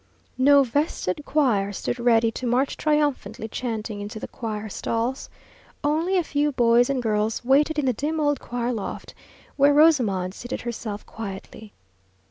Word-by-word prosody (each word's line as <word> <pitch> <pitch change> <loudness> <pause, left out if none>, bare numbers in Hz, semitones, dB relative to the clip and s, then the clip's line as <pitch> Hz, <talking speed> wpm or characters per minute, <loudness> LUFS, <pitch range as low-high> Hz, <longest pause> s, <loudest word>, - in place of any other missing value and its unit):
No 280 +1 +6
vested 275 - -1
choir 225 -10 +2
stood 240 +4 -4
ready 230 -1 +3
to 250 +2 -5
march 255 +3 +1
triumphantly 290 -8 0
chanting 220 -3 -4
into 210 +2 -6
the - - -6
choir 220 -3 -5
stalls. 230 +5 -3 0.5
Only 320 +6 +1
a 355 - +2
few 295 -1 0
boys 240 -1 +4
and 265 -3 -1
girls 215 +1 -1
waited 295 +4 +3
in 295 - +1
the 255 - +2
dim 305 +7 -2
old 290 -2 +1
choir 245 0 -3
loft, 215 -4 -6 0.4
where 285 +1 +5
Rosamond 230 - +3
seated 245 +4 -6
herself 220 -3 -5
quietly. 210 0 -8
245 Hz, 150 wpm, -24 LUFS, 220-285 Hz, 0.5 s, No